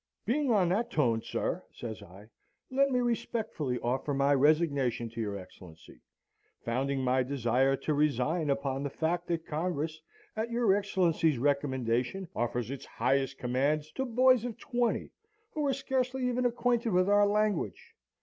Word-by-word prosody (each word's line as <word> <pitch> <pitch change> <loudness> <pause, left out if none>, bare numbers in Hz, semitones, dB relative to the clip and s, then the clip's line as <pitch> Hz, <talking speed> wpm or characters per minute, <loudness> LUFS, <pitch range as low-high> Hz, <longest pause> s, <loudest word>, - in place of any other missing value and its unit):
"'Being 275 +5 +1
on 195 -7 +3
that 215 +6 0
tone, 120 -7 +1
sir,' - - -3
says 110 -4 -7
I, 95 +4 -13 0.5
'let 275 +1 +3
me 250 -2 +1
respectfully 225 - -2
offer 130 +4 -1
my 140 +1 +3
resignation 140 -5 +2
to 115 0 -5
your 100 -2 -3
Excellency, 90 -7 -14 0.6
founding 135 +3 -1
my 130 +1 +2
desire 130 0 +1
to 150 - -2
resign 150 +2 +1
upon 140 -1 -1
the 140 - -2
fact, 170 +4 -2
that 170 -2 -2
Congress, 160 -1 -3 0.3
at 220 +2 -2
your 235 -4 +3
Excellency's 175 -7 +1
recommendation, 130 +4 0
offers 120 +1 -2
its 140 - -6
highest 135 0 0
commands 145 +5 0
to 265 - -2
boys 255 -1 +4
of 240 -2 -5
twenty, 240 -2 -1 0.4
who 300 -2 -1
are - - +3
scarcely 260 -1 -1
even 250 0 +1
acquainted 240 -1 0
with 185 +1 +3
our 205 0 +5
language.' 210 -3 -1
155 Hz, 150 wpm, -30 LUFS, -, 0.6 s, our